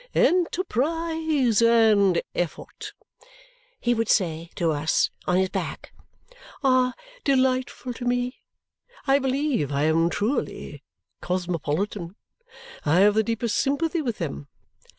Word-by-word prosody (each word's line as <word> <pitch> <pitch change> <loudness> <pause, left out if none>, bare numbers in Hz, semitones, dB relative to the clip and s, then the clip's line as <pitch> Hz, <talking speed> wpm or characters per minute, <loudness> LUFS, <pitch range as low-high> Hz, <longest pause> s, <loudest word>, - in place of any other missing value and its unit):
"Enterprise 320 - +1
and 215 -6 +4
effort," 175 -2 -4 0.9
he 240 - +1
would 225 -2 -1
say 165 -4 +1
to 165 -2 +1
us 150 +1 +1 0.2
(on 180 - +3
his 190 0 +2
back), - - -5 0.7
"are 255 -2 +3 0.3
delightful 255 -2 0
to 245 - -8
me. 245 +1 -1 0.6
I 275 0 +4
believe 265 - 0
I 140 +1 0
am 165 +2 +3
truly 215 +10 -3 0.4
cosmopolitan. 180 +1 -2 0.7
I 160 +5 +3
have 205 +1 +6
the 220 - +3
deepest 230 -1 -2
sympathy 320 +4 0
with 240 -7 -3
them. 70 0 -5
230 Hz, 110 wpm, -25 LUFS, 175-265 Hz, 0.9 s, have